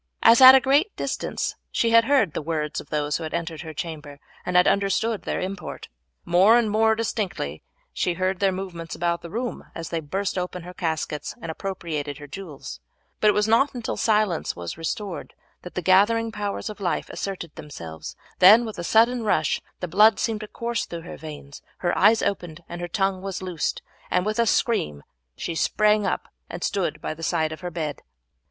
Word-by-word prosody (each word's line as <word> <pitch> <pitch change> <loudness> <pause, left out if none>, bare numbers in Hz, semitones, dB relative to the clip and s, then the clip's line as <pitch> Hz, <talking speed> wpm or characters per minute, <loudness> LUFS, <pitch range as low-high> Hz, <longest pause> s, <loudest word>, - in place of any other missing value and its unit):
As 230 +3 +7
at 260 0 +12
a - - +8
great 285 - +2
distance - - -2 0.2
she 230 - +1
had 230 0 +6
heard 255 - +3
the - - -2
words 155 -1 -2
of - - -17
those 150 -1 0
who 165 - -7
entered 160 0 -4
her 160 -2 -7
chamber, 150 -2 -7 0.2
and 180 - -3
had 180 0 +6
understood 200 +2 +1
their - - -3
import. 185 0 -6 0.4
More 190 +7 +6
and 225 -3 +1
more 220 +1 +3
distinctly 195 - -3 0.3
she 175 - 0
heard 185 +1 -1
their 195 -1 +3
movements 180 -3 -6
about 170 0 -1
the 170 - -8
room 235 +5 -4
as 165 - -5
they 165 - -1
burst 190 +5 -2
open 180 -1 -4
her 180 +1 -9
caskets 160 -4 -3
and 165 - -5
appropriated 160 -6 -4
her 150 - -9
jewels, 145 - -8 0.4
but 215 - +3
it 210 - +6
was 210 +1 +2
not 255 +5 +3
until 240 -2 -3
silence 210 -6 +1
was 85 -1 -6
restored 175 +4 -5 0.3
that 180 - -10
the 180 - -2
gathering 225 +5 +4
powers 205 -2 -3
of 215 -1 -7
life 185 -3 -1
asserted 185 -5 -5
themselves; 80 - -8 0.2
then 215 +6 +8
with 220 -5 -7
a - - -3
sudden 235 +6 +4
rush 155 -8 +1 0.2
the 180 - -2
blood 210 +4 +5
seemed 225 -2 -1
to 215 - -7
course 235 +1 -3
through 170 -1 -6
her 175 - -8
veins, 150 -2 -10 0.2
her 175 - 0
eyes 220 +1 +5
opened, 170 -4 -3
and 175 0 -7
her 175 - -3
tongue 195 +1 0
was 190 -1 -5
loosed, 175 -4 -2 0.3
and 180 +1 +1
with 215 +2 -1
a 230 - +3
scream 75 - +1 0.3
she 170 - -4
sprang 210 +5 +2
up - - -2 0.2
and - - -6
stood 195 -3 -1
by - - -3
the 160 - -12
side 160 -2 0
of 155 - -7
her 180 - -4
bed. 155 -4 -4
185 Hz, 200 wpm, -24 LUFS, 160-215 Hz, 0.4 s, at